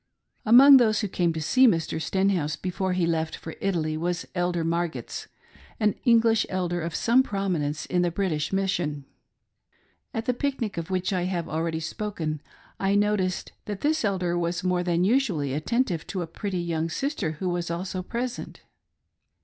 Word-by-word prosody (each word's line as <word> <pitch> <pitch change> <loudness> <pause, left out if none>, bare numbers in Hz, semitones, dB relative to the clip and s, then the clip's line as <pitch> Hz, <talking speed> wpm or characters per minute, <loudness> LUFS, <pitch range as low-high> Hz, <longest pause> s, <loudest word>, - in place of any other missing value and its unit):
Among 270 +5 +9
those 215 -4 +3
who 210 - -1
came 175 -2 +1
to 160 - -4
see 255 - +5
Mr. 165 -5 0
Stenhouse 180 -3 +1
before 185 +3 -2
he 180 -2 +1
left 160 -1 -1
for 160 - -8
Italy, 165 -5 0
was 175 +2 -2
Elder 175 -2 0
Margetts, 170 0 -3 0.5
an 210 -2 +3
English 230 -2 +4
elder 175 -2 -1
of 165 0 -4
some 240 +3 +4
prominence 175 - -2
in 180 - 0
the 175 - +2
British 165 -4 -1
mission." 175 -7 -1 1.1
At 225 0 -3
the 250 - +1
pic 275 +2 -2
nic, 220 -5 -3
of 170 +1 -4
which 185 +1 -1
I 180 -1 0
have 180 -3 -2
already 160 +1 -2
spoken, 160 -3 -4 0.4
I 195 +1 +1
noticed 205 -3 0
that 205 -2 -5
this 310 0 +1
elder 185 -4 0
was 175 +1 -2
more 180 -1 +1
than 175 0 +1
usually 190 - +1
attentive 175 - -1
to 185 -3 -3
a - - -4
pretty 185 +2 -4
young 165 -1 -1
sister 225 - -2
who 185 +5 -4
was 175 -1 -2
also 185 +2 -3
pres 240 +6 -3
ent. - - -9
180 Hz, 175 wpm, -26 LUFS, 165-205 Hz, 1.1 s, Among